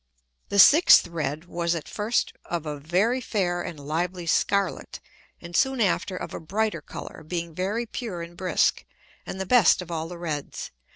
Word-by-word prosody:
The 200 - -1
sixth 300 - +8
red 155 -1 -4
was 170 -1 -1
at 165 - -6
first 215 +3 -1
of 170 -2 -3
a 150 -1 -5
very 190 - +1
fair 180 -6 -1
and 165 -3 -6
lively 170 +5 -3
scarlet, 200 +4 0 0.4
and 170 0 -9
soon 265 +4 +2
after 190 -2 0
of - - -6
a - - -5
brighter 195 +1 -1
Colour, - - -9
being 170 +1 -4
very 200 +8 -2
pure 215 -7 -5
and 170 +1 -11
brisk, 185 0 +1 0.4
and 190 - -6
the 190 - -2
best 240 -2 +5
of 180 -2 -7
all 160 -1 -3
the 175 +1 -8
reds. 155 -4 -5
175 Hz, 175 wpm, -25 LUFS, 165-200 Hz, 0.4 s, sixth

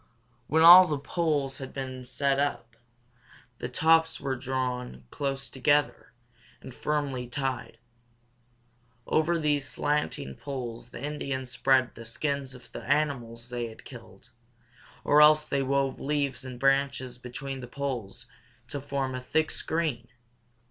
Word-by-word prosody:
When 160 +2 +3
all 180 +2 +11
the 150 -3 -1
poles 145 -2 -1
had 135 -1 -8
been 130 -2 -5
set 140 +2 0
up, 120 -5 -2 0.8
the 125 - -4
tops 160 +4 +3
were 135 -1 -2
drawn 125 - -3
close 135 -2 -3
together 145 +4 +1 0.5
and 130 - -11
firmly 140 -4 -2
tied. 130 -2 -3 1.3
Over 165 +2 +2
these 145 -4 0
slanting 145 - -1
poles 125 -4 -6
the - - -9
Indians 135 -4 -4
spread 130 -1 +2
the 115 - -10
skins 135 +3 -3
of 125 - -15
the - - -7
animals 125 -5 -1
they 120 -1 -3
had 110 - -13
killed, - - -13 0.7
or 150 +1 +5
else 150 0 +6
they 140 -2 0
wove 135 0 0
leaves 140 -2 -1
and 125 -1 -8
branches 135 -2 +1
between 135 +2 -6
the 125 - -8
poles 125 -6 -5 0.4
to 145 - -4
form 135 -1 -2
a 130 - -4
thick 155 +5 0
screen. 155 -8 -2
135 Hz, 135 wpm, -28 LUFS, 125-145 Hz, 1.3 s, all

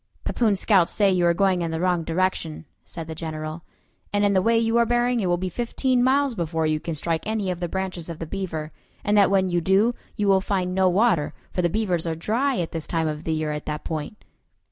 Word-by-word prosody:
"Pepoon's 215 -5 +1
scouts 190 -5 +3
say 200 -2 +4
you 180 -2 +2
are 170 - +4
going 190 -1 +2
in 165 - -1
the 160 0 -3
wrong 180 -1 +1
direction," 165 -2 -1 0.2
said 165 -2 -8
the 160 - -6
General; 155 0 -5 0.5
"and 205 0 +2
in 200 - +3
the 190 - +3
way 230 +4 +3
you 225 0 +2
are 235 - +4
bearing 240 +1 +2
it 195 - 0
will 175 0 +2
be 185 +1 -3
fifteen 245 +5 0
miles 275 +1 +3
before 165 -5 -1
you 155 0 +1
can 165 +1 -4
strike 165 +2 -1
any 215 -4 -1
of 175 - -5
the 175 -1 -3
branches 185 -3 -4
of 165 - -5
the 165 - -5
Beaver; 160 -4 -4 0.3
and 205 - +1
that 200 -2 +5
when 190 -2 +2
you 175 0 +1
do, 195 +7 +3 0.2
you 210 -3 0
will 195 -1 +4
find 185 -2 -1
no 190 0 +3
water, 185 -5 +2 0.2
for 180 - -1
the 175 - +2
Beavers 180 -4 -1
are 165 - -1
dry 240 - 0
at 170 - -2
this 160 -2 -5
time 165 -1 0
of 155 0 -4
the 160 - -1
year 155 -1 -1
at 150 0 -5
that 150 0 -4
point." 160 +5 -5
185 Hz, 245 wpm, -24 LUFS, 165-205 Hz, 0.5 s, that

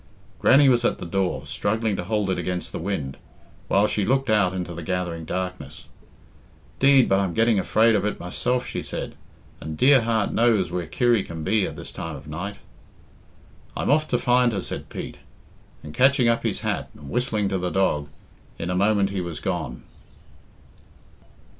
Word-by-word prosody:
Grannie 140 +1 +6
was 120 -2 +4
at - - +1
the - - -7
door, 95 +1 -1
struggling 110 0 -1
to - - -3
hold 105 0 0
it - - -1
against 90 -1 -3
the - - -5
wind, 80 -7 -3 0.5
while 100 +2 +3
she 105 -1 0
looked 135 +3 +1
out 105 -4 +3
into 90 -2 -4
the 85 - -6
gathering 85 -1 -3
darkness. 90 +2 -5 0.9
"'Deed, 135 -2 +6
but 95 0 +3
I'm 95 -4 -1
getting 115 -2 +3
afraid 110 +4 +3
of 105 - +1
it 105 - -2
myself," 125 +8 -1
she - - -4
said, - - -6 0.5
"and 80 0 -6
dear 135 - +6
heart 110 -2 0
knows 110 -7 +2
where 90 -2 -3
Kirry 120 +5 +2
can 80 -2 -7
be 100 +3 +2
at - - -7
this - - -8
time 80 -2 -6
of 70 +1 -11
night." 90 +7 -5 1.2
"I'm - - 0
off 155 +1 +3
to 125 - +1
find 125 -1 +3
her," 100 - -1
said - - -6
Pete, - - -7 0.7
and, 75 - -9
catching 130 - +4
up 115 0 +2
his - - -2
hat - - -2
and 70 -2 -11
whistling 115 -4 0
to 95 - -1
the 90 0 -1
dog, 75 -7 0 0.5
in 85 +2 -3
a - - -1
moment 100 +1 +2
he 95 -2 -2
was 85 -2 -5
gone. - - -4
100 Hz, 185 wpm, -24 LUFS, 90-115 Hz, 1.2 s, Grannie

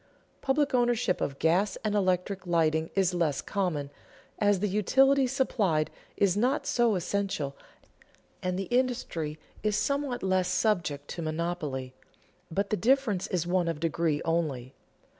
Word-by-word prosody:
Public 275 +1 +1
ownership 240 -6 +2
of 140 - -2
gas 180 +6 +2
and 210 - +1
electric 185 -1 0
lighting 160 -2 +2
is 190 -2 +2
less 165 -6 +1
common, 160 -8 -2 0.5
as 205 -2 +3
the 210 - 0
utility 265 +7 +3
supplied 210 - +1 0.3
is 195 -2 +3
not 250 +7 +1
so 235 -3 +2
essential 180 -6 -2 0.9
and 180 0 -1
the 195 - -1
industry 240 -12 -1 0.2
is 210 -1 +1
somewhat 280 -2 -1
less 185 -1 +2
subject 170 -10 0
to 170 - -5
monopoly; 155 -5 -3 0.6
but 195 +4 -2
the 215 - +2
difference 230 -3 +2
is 175 -3 -1
one 175 0 +1
of 165 -3 -2
degree 160 -1 0
only. 145 -7 -1
185 Hz, 140 wpm, -28 LUFS, 160-215 Hz, 0.9 s, as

